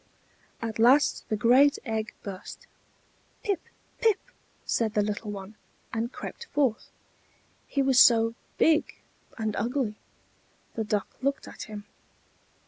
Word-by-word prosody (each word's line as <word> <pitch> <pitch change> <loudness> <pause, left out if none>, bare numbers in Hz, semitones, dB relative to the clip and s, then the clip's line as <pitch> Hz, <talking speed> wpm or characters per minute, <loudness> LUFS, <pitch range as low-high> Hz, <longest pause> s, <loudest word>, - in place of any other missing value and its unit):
At 225 -1 -4
last 260 +6 +4
the 215 - +1
great 255 +7 +5
egg 220 -2 -3
burst. 195 -2 -8 0.8
"Pip! 395 -4 0 0.4
pip!" 445 -4 +4 0.5
said 225 -2 0
the 210 - +3
little 210 +1 -3
one, 200 0 -7 0.4
and 230 +2 -1
crept 470 - -7
forth. 275 - 0 0.8
He 275 - +1
was 265 -1 +4
so 230 -3 +6 0.2
big 320 0 +3 0.4
and 220 -2 -2
ugly. 240 0 0 0.8
The 225 - -2
Duck 210 -1 -2
looked 275 +1 -1
at - - -8
him. 205 -1 -7
230 Hz, 125 wpm, -27 LUFS, 215-275 Hz, 0.8 s, so